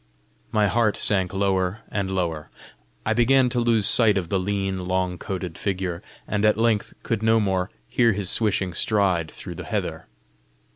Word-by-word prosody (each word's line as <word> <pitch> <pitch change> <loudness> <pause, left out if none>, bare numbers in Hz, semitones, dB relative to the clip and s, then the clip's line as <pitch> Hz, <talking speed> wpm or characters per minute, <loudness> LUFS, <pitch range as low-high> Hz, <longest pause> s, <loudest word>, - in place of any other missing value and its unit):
My 105 -1 +3
heart 110 +1 +1
sank 95 -3 +2
lower 95 +1 0
and 100 -2 -2
lower. 85 -5 -2 0.6
I 110 - +2
began 125 +2 +4
to 120 - -1
lose 115 -3 +2
sight 110 -3 +4
of 90 -3 -3
the 95 - +1
lean, 95 -1 -2
long 90 -1 -1
coated 90 -4 -5
figure, 90 -3 -2 0.3
and 105 -1 -1
at 105 -1 +4
length 115 -2 +1
could 115 -2 -1
no 110 0 +4
more 95 -2 0 0.2
hear 120 -2 +3
his 100 -1 -2
swishing 100 -5 0
stride 95 -5 +1
through - - -8
the - - -8
heather. - - -3
100 Hz, 165 wpm, -24 LUFS, 95-110 Hz, 0.6 s, began